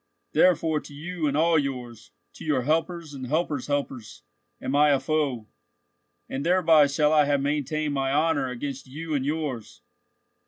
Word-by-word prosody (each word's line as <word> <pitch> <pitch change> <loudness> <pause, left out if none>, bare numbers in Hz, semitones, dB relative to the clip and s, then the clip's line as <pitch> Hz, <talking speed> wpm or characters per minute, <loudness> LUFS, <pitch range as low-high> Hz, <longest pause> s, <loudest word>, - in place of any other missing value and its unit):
Therefore 160 -3 +3
to 145 - -12
you 165 +1 -3
and 140 0 0
all 165 0 +4
yours, 125 -5 -5 0.2
to - - -11
your 145 -5 0
helpers 165 +2 -1
and 130 -2 -6
helpers' 150 -2 -1
helpers, 140 -5 -4 0.4
am 135 - -3
I 150 +1 +5
a 140 -2 +3
foe. 140 -9 -1 0.8
And 135 - -4
thereby 165 -4 +5
shall 150 +2 +2
I 150 -1 +5
have 140 -1 +1
maintained 150 +1 -1
my 135 -1 0
honour 150 -2 +1
against 130 +2 -5
you 155 +4 -6
and 140 -3 0
yours. 150 - -4
145 Hz, 160 wpm, -25 LUFS, 135-160 Hz, 0.8 s, I